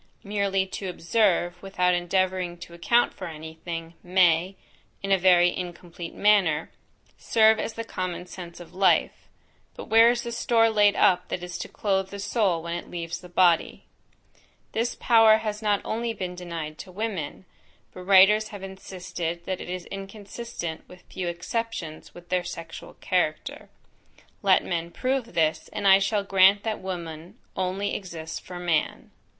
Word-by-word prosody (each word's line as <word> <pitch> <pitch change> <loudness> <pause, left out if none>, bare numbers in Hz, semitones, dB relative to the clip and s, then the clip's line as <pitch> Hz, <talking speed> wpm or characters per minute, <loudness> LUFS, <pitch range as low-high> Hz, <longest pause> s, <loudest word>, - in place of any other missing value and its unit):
Merely 200 -2 0
to 190 0 -6
observe, 175 -1 +1
without 180 -2 +1
endeavouring 180 0 0
to 170 0 -11
account 235 +8 +2
for 185 - -7
any 160 0 -8
thing, 165 -1 -5
may, 180 0 +3 0.5
(in 195 - -2
a 195 - +6
very 175 -1 +5
incomplete 175 -1 -7
manner) 190 -7 +3 0.5
serve 220 -1 +4
as 225 - -3
the 230 - -5
common 185 -5 -4
sense 180 -1 -10
of 175 - -12
life; 190 +1 +2 0.5
but - - -9
where 225 +1 +7
is 240 0 0
the 235 - -5
store 230 -2 +3
laid 205 -1 +4
up 180 0 +3
that 180 - -4
is 180 -1 -6
to - - -5
clothe 195 -2 -1
the 200 - -7
soul 200 -5 0
when 170 0 -4
it 175 - -6
leaves 170 0 -5
the 180 - -12
body? 175 -2 +2 0.9
This 230 +2 -1
power 225 -2 +6
has 215 -1 -4
not 205 -2 +1
only 230 +1 -2
been 185 -4 -5
denied 170 -4 -6
to 185 - -9
women; 190 -5 -4 0.5
but 185 - -9
writers 195 +3 +6
have 205 -3 -9
insisted 180 -3 -6
that 185 -1 -3
it - - -8
is 180 -1 -5
inconsistent, 195 -3 -7
with 180 0 -14
a - - -21
few 185 -2 -3
exceptions, 175 -1 -4
with 175 0 -13
their 180 -1 +1
sexual 165 -2 -8
character. - - -2 0.7
Let 195 -2 +4
men 170 -1 -2
prove 255 +3 -2
this, 160 -1 +1
and 205 -2 -1
I 195 0 +8
shall 200 +1 0
grant 195 +1 +5
that 220 -1 -2
woman 170 -3 -7 0.2
only 190 +2 -2
exists 165 -4 -6
for 180 - -9
man. 175 -3 -1
185 Hz, 165 wpm, -26 LUFS, 175-205 Hz, 0.9 s, I